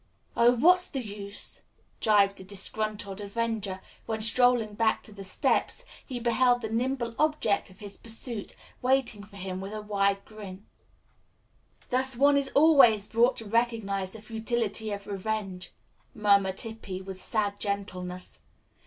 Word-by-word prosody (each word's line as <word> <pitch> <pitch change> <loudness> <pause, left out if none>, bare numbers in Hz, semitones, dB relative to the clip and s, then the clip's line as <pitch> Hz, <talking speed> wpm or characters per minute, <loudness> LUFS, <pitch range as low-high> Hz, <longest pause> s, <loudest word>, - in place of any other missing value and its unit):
"Oh, 235 +1 +5
what's 360 +8 +5
the 270 - -4
use!" 205 -3 -5 0.4
jibed 200 -2 +3
the - - -9
disgruntled 205 +1 -2
avenger, 205 -2 -3 0.3
when, 220 -1 -2
strolling 230 -1 +4
back 220 +1 +1
to - - -11
the 200 -1 -9
steps, 195 - 0 0.2
he 250 -2 -6
beheld 245 +1 +2
the 220 - -4
nimble 240 +1 -1
object 300 -12 +1
of 185 - -17
his 205 -2 -5
pursuit 225 -1 -1 0.3
waiting 250 -5 +1
for 205 0 -16
him 185 -1 -5
with 195 +2 -7
a 215 - -4
wide 200 -1 0
grin. 205 -2 -10 1.3
"Thus 260 0 +2
one 285 +2 +5
is 280 -1 +2
always 275 -9 +6
brought 235 +4 +2
to 225 - -6
recognize 205 -4 -1
the 220 -1 -8
futility 225 -1 -2
of 200 -1 -5
revenge," 195 -2 -4 0.4
murmured 200 -3 +3
Hippy 220 -5 -6
with 190 -1 -6
sad 205 -2 -1
gentleness. 185 -3 -4
215 Hz, 145 wpm, -28 LUFS, 200-235 Hz, 1.3 s, always